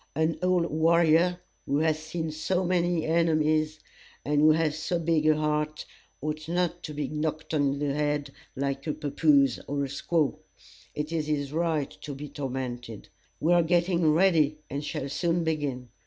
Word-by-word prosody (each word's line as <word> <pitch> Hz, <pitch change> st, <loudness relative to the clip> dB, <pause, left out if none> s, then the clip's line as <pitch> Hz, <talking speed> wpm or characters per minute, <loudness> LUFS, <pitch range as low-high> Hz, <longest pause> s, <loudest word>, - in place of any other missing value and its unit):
An 160 Hz, +2 st, 0 dB
old 180 Hz, -1 st, +2 dB
warrior 170 Hz, +2 st, +3 dB, 0.3 s
who 140 Hz, -, +1 dB
has 155 Hz, 0 st, +1 dB
seen 160 Hz, 0 st, -4 dB
so 180 Hz, +4 st, -1 dB
many 175 Hz, -2 st, +1 dB
enemies, 155 Hz, -1 st, +2 dB, 0.5 s
and 145 Hz, 0 st, +2 dB
who 155 Hz, +1 st, +7 dB
has 155 Hz, -1 st, +1 dB
so 175 Hz, +3 st, -1 dB
big 160 Hz, -2 st, +1 dB
a 155 Hz, -, +5 dB
heart, 150 Hz, 0 st, -1 dB, 0.4 s
ought 155 Hz, +1 st, -4 dB
not 175 Hz, 0 st, 0 dB
to 155 Hz, -, -6 dB
be 145 Hz, -2 st, -2 dB
knocked 155 Hz, +2 st, -3 dB
in 140 Hz, -2 st, +1 dB
the 145 Hz, -1 st, -1 dB
head 145 Hz, -1 st, -1 dB, 0.2 s
like 140 Hz, +2 st, -3 dB
a 150 Hz, -, 0 dB
pappoose 145 Hz, -3 st, +2 dB
or 140 Hz, 0 st, -1 dB
a -, -, -2 dB
squaw. 145 Hz, +2 st, 0 dB, 0.6 s
It 150 Hz, +1 st, -3 dB
is 160 Hz, -2 st, -1 dB
his 145 Hz, -2 st, -2 dB
right 160 Hz, -3 st, 0 dB
to 145 Hz, -2 st, -6 dB
be 145 Hz, +2 st, -7 dB
tormented. 125 Hz, -6 st, -5 dB, 0.3 s
We 165 Hz, +3 st, +3 dB
are 175 Hz, -, +5 dB
getting 170 Hz, -1 st, +2 dB
ready, 155 Hz, -3 st, +3 dB
and 140 Hz, +2 st, -3 dB
shall 140 Hz, -2 st, -4 dB
soon 170 Hz, +4 st, 0 dB
begin. 145 Hz, -6 st, -2 dB
155 Hz, 170 wpm, -27 LUFS, 145-165 Hz, 0.6 s, who